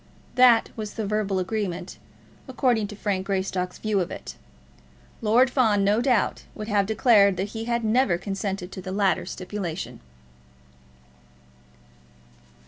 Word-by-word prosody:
That 250 -3 +5
was 215 -2 -6
the 220 - -3
verbal 205 -1 -1
agreement, 185 -2 -3 0.5
according 245 -4 +1
to 210 - -9
Frank 195 -2 -2
Greystock's 190 -2 -2
view 215 -2 0
of 180 - -1
it. - - -8 0.9
Lord 240 +4 +4
Fawn, 220 -7 +3
no 205 +3 +3
doubt, 245 -4 +1
would 215 -1 -6
have 205 -3 +1
declared 210 -4 +4
that 195 +2 -2
he 225 +1 -5
had 235 0 -1
never 220 -4 +2
consented 195 -1 -4
to 190 - -7
the 185 - -6
latter 195 0 +1
stipulation. 185 -3 -5
205 Hz, 135 wpm, -25 LUFS, 190-225 Hz, 0.9 s, That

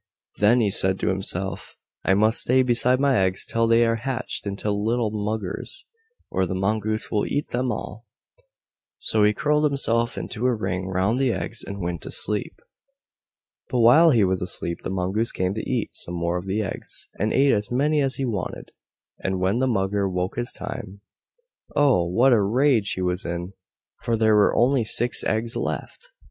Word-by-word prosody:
Then 115 +4 +4
he 105 -3 +1
said 95 0 +1
to - - +1
himself, 95 0 -3 0.3
"I 95 - +3
must 110 +3 +3
stay 130 +1 +3
beside 125 +1 +2
my 140 -5 +3
eggs 95 0 0
till 115 0 +1
they 115 +1 +4
are 115 0 +1
hatched 120 -2 -3
into 100 +1 -2
little 110 +2 0
muggers, 105 -2 -4 0.5
or 95 -1 0
the 95 - -3
Mongoose 110 +3 -1
will 105 - 0
eat 145 - -2
them 125 +1 -1
all." 110 +1 -6 0.9
So 110 -1 +2
he 105 - +5
curled 150 +6 +1
himself 120 -5 0
into 125 +2 -2
a 125 - +2
ring 95 -3 -3
round 95 +6 0
the 135 -2 +2
eggs 95 +4 -3
and 100 0 -7
went 85 -2 -3
to - - -7
sleep. 105 0 -1 1.1
But 125 - +1
while 150 +9 +7
he 120 -8 +4
was 95 -1 0
asleep 85 -1 -2
the - - -5
Mongoose 95 +5 -1
came 90 +1 -1
to 110 - -5
eat 125 -4 -2
some 90 - -3
more 85 +1 -1
of 90 - -10
the 105 +3 -1
eggs, 95 - -6
and 105 +2 0
ate 135 0 +4
as 105 -1 0
many 145 +4 +1
as 135 -2 0
he 135 - -2
wanted, 105 -7 -4 0.5
and 95 0 -2
when 95 +5 +1
the 130 - +1
Mugger 100 -3 0
woke 90 0 -2
this 120 +1 -3
time, 100 -6 -7 0.7
oh! 140 -12 +3
WHAT 120 +9 +4
a 110 - +4
rage 115 +1 +2
he 95 - -3
was 90 +2 -1
in, 85 +2 -5 0.5
for 115 -1 -1
there 110 0 +3
were 105 -1 +4
only 125 0 +3
six 120 +2 +1
eggs 115 +2 -1
left! - - -5
110 Hz, 185 wpm, -24 LUFS, 95-120 Hz, 1.1 s, while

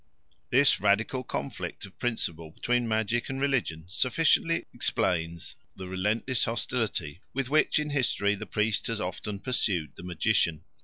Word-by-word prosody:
This 135 +3 +5
radical 110 +6 +2
conflict 70 - -5
of 95 - -16
principle 85 -10 -2
between 120 +8 0
magic 110 +2 0
and 135 0 -3
religion 125 - 0
sufficiently 150 - +2
explains 85 -2 -1 0.2
the 95 -1 -7
relentless 105 +7 0
hostility 110 - -2
with 135 -2 -1
which 155 - +4
in 150 -1 0
history 125 -7 +2
the 105 +1 -6
priest 105 +1 +1
has 115 -2 -2
often 100 +2 -4
pursued 95 - 0
the - - -10
magician. 85 -2 +1
105 Hz, 140 wpm, -28 LUFS, 90-125 Hz, 0.2 s, This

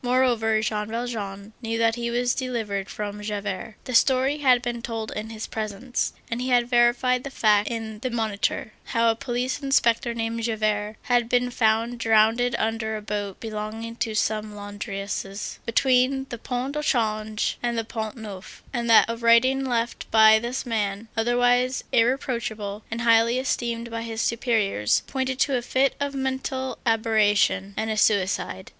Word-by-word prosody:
Moreover, 240 -3 +2
Jean 210 -1 -1
Valjean 220 -3 -5
knew 225 -1 -2
that 225 0 +3
he 235 0 -3
was 245 +1 +1
delivered 220 -7 -3
from 210 0 -5
Javert. 210 +1 -4
The 255 - -6
story 265 +4 +3
had 255 -4 +4
been 240 -1 -3
told 225 -2 -4
in 215 +1 -5
his 220 -1 -6
presence, 220 +3 -3 0.2
and 230 +2 -2
he 255 - -2
had 245 -1 +3
verified 245 +1 +3
the 275 - -5
fact 210 -5 +2
in 220 -2 -5
the 255 - -2
Moniteur, 220 -2 -1
how 230 0 +2
a - - -3
police 250 +3 -2
inspector 235 -4 +2
named 230 0 -2
Javert 215 -2 -1
had 240 -2 +1
been 245 0 +2
found 230 +1 +1
drowned 225 +1 +4 0.2
under 220 0 -1
a - - -7
boat 205 -2 -4
belonging 220 +1 -5
to 220 -2 -2
some 215 0 -1
laundresses, 205 -1 -5
between 260 +3 +2
the 240 - -6
Pont 255 +4 -3
au 300 - -1
Change 215 -5 0
and 240 -1 -1
the 225 - -1
Pont 220 +1 -5
Neuf, 205 -4 -9
and 235 -2 -2
that 225 - +8
a 230 - -2
writing 235 +3 +4
left 240 -2 -2
by 220 0 +7
this 240 +4 -4
man, 215 -2 -2
otherwise 245 +2 +2
irreproachable 225 -4 0
and 230 +2 -4
highly 230 +1 +4
esteemed 235 -2 -2
by 230 0 -3
his 225 -1 -5
superiors, 220 - +1
pointed 260 -1 -2
to 270 -1 +2
a - - -2
fit 260 +2 +1
of 285 -1 -2
mental 265 0 -3
aberration 215 -3 +2
and 220 0 -1
a 215 - -2
suicide. 190 -2 +1
230 Hz, 165 wpm, -25 LUFS, 215-245 Hz, 0.2 s, that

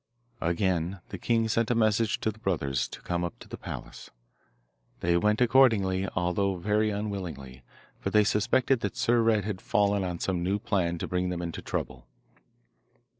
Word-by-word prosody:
Again 85 +1 0
the 100 - -6
king 115 +1 +1
sent 115 +1 +1
a 120 - +2
message 110 -1 +2
to 110 - 0
the 110 - -17
brothers 70 - -1
to - - -11
come 85 0 -1
up 85 - -4
to - - -13
the - - -7
palace. - - -8 0.9
They 85 0 +2
went 105 +6 +2
accordingly, 110 -7 +4
although 90 +2 +1
very 105 +4 +1
unwillingly, 90 -11 -5 0.4
for - - -2
they 105 0 +5
suspected 120 +5 +2
that 105 -4 -4
Sir 120 0 +3
Red 110 -3 +2
had 105 -3 -4
fallen 100 -1 +2
on 90 -2 -3
some 90 0 -1
new 95 +3 +1
plan 95 -6 0
to - - -4
bring 90 0 -1
them 90 -1 -3
into 85 -1 -5
trouble. - - -4
100 Hz, 175 wpm, -28 LUFS, 85-110 Hz, 0.9 s, they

